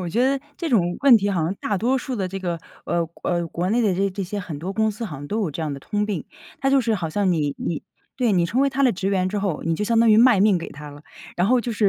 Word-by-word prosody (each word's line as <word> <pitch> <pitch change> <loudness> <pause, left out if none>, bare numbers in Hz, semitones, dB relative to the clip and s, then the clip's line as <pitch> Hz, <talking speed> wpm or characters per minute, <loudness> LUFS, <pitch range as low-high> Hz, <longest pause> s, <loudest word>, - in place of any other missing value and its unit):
我 180 - -3
觉 235 +9 +1
得 275 0 +1 0.2
这 330 -4 -3
种 175 -6 +2
问 275 -4 +7
题 205 -1 0
好 185 -4 0
像 165 +4 0
大 205 - -2
多 250 +7 +1
数 255 0 -4
的 190 -4 -2
这 195 +1 -5
个， 175 -3 -2 0.3
呃， 170 0 0 0.2
呃， 175 -1 0
国 175 +3 -2
内 235 +1 +2
的 205 -4 +2
这 195 +2 +1
这 195 +1 -4
些 205 +3 -4
很 175 -6 -6
多 190 +4 -4
公 220 +1 +1
司 230 +3 -6
好 155 -9 -6
像 145 +1 -8
都 215 +6 -2
有 190 - -1
这 150 - -6
样 150 -3 -2
的 140 - -9
通 210 +5 -2
病。 195 -7 -3 0.4
它 270 - +1
就 275 -1 +5
是 230 -2 0
好 165 -5 -3
像 195 0 +1
你 145 -4 -1
你 165 - -3 0.3
对， 245 -4 +1
你 175 -3 +2
成 245 +9 0
为 275 0 +3
他 275 +1 -1
的 250 - +4
职 195 +1 -2
员 185 -2 +1
之 205 +1 -2
后， 195 -6 -2
你 165 0 +1
就 210 - -2
相 230 +1 +2
当 230 0 +5
于 215 - +6
卖 240 -3 +6
命 200 -1 +4
给 170 - -5
他 150 +1 -10
了。 145 +1 -13 0.3
然 180 +4 +2
后 250 -1 +4
就 235 0 -3
是 210 -2 +3
195 Hz, 340 characters per minute, -23 LUFS, 175-230 Hz, 0.4 s, 问